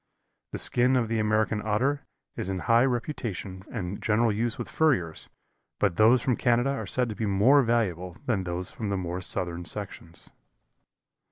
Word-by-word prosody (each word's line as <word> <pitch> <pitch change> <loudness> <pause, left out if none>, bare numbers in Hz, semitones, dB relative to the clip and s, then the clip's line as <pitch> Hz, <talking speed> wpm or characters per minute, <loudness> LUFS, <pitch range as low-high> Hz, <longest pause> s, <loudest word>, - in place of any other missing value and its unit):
The - - -4
skin 125 +2 +2
of 120 -3 +1
the 115 -1 0
American 110 0 +1
Otter 130 +7 0 0.3
is 95 - -4
in 95 -2 -3
high 115 +2 +5
reputation 115 - -3
and 90 +2 -4
general 115 +1 +2
use 115 +2 -1
with - - -5
furriers, 105 - 0 0.5
but 85 - +1
those 115 +3 +5
from 125 -3 +1
Canada 120 +2 +2
are 140 - -4
said 125 -1 +1
to 105 - -5
be 110 - -2
more 110 +9 +5
valuable 95 -8 -1
than 115 -8 0
those 90 +1 -4
from 110 -3 -5
the 100 - -1
more 90 0 -4
southern 85 -1 0
sections. 90 -4 -6
110 Hz, 170 wpm, -27 LUFS, 95-120 Hz, 0.5 s, high